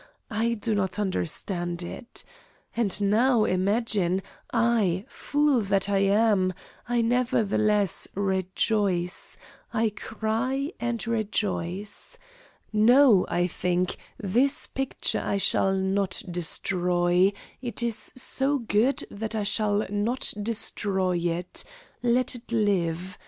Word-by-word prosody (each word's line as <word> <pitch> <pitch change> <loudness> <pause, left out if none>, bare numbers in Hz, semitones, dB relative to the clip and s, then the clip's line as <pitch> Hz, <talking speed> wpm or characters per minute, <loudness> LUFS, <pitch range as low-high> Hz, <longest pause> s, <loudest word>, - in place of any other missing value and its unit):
I 230 +2 +1
do 220 +1 -2
not 195 -2 -1
understand 175 -2 -2
it. 235 +7 -7 0.5
And, 215 -5 +1
now, 225 +3 +4
imagine, 190 -1 +1 0.3
I 225 -5 +2
fool 290 -4 +1
that 195 -1 0
I 200 -1 +2
am 200 -1 +3 0.4
I 240 -1 +2
nevertheless 215 -5 +1
rejoice, 190 -1 -1 0.3
I 225 -1 +1
cry 230 - -2
and 235 -2 -2
rejoice. 205 -4 -2 0.6
No, 230 -1 +6
I 175 - +1
think, 180 0 -1 0.2
this 245 +8 +1
picture 270 0 -2
I 200 - 0
shall 195 0 +2
not 190 0 0
destroy; 175 +1 +1 0.3
it 240 -1 -3
is 235 -2 -3
so 270 +3 0
good 235 +2 +1
that 220 +2 -4
I 215 - 0
shall 205 0 +1
not 205 +6 0
destroy 200 -4 +1
it. 175 +1 -2 0.4
Let 245 +1 +3
it 240 -1 -10
live. 185 -5 0
205 Hz, 110 wpm, -26 LUFS, 185-230 Hz, 0.6 s, No